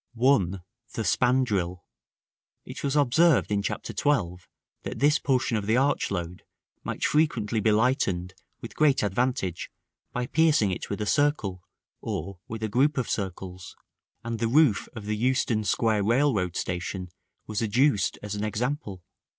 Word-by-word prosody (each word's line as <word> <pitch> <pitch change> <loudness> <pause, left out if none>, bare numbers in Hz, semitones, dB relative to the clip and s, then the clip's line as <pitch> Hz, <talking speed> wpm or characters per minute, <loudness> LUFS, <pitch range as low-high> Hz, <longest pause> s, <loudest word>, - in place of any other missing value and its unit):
(1.) 105 -7 +2 0.3
The 110 - -2
Spandril. 105 -6 +1 0.8
It - - -8
was 140 0 0
observed 145 0 +3
in 100 -1 +1
Chapter 100 - -4
XII., 100 -12 0 0.4
that - - -6
this 150 +3 +3
portion 125 -5 +1
of 100 -1 -4
the 110 +2 +3
arch 140 +2 +1
load 90 -2 -4 0.4
might - - -3
frequently 120 -8 +1
be 110 +1 +2
lightened 105 -6 +1 0.3
with - - -8
great 145 -5 +3
advantage 105 -3 -1 0.4
by 125 0 -2
piercing 150 -8 +3
it 90 - -5
with 100 +1 -3
a - - -1
circle, 110 -9 +1 0.4
or 100 -2 -5
with 110 -1 -6
a - - +1
group 135 +7 +2
of 130 - -1
circles; 95 -2 -5 0.5
and 115 -1 -4
the 115 - +1
roof 130 -3 +3
of 110 -3 -7
the 105 0 -1
Euston 120 -1 +1
Square 105 -1 +1
railroad 115 -7 +1
station 90 +1 -4 0.4
was 105 0 -3
adduced 115 0 +2
as 105 -1 -4
an 105 0 -3
example. 110 - -3
110 Hz, 150 wpm, -26 LUFS, 100-130 Hz, 0.8 s, observed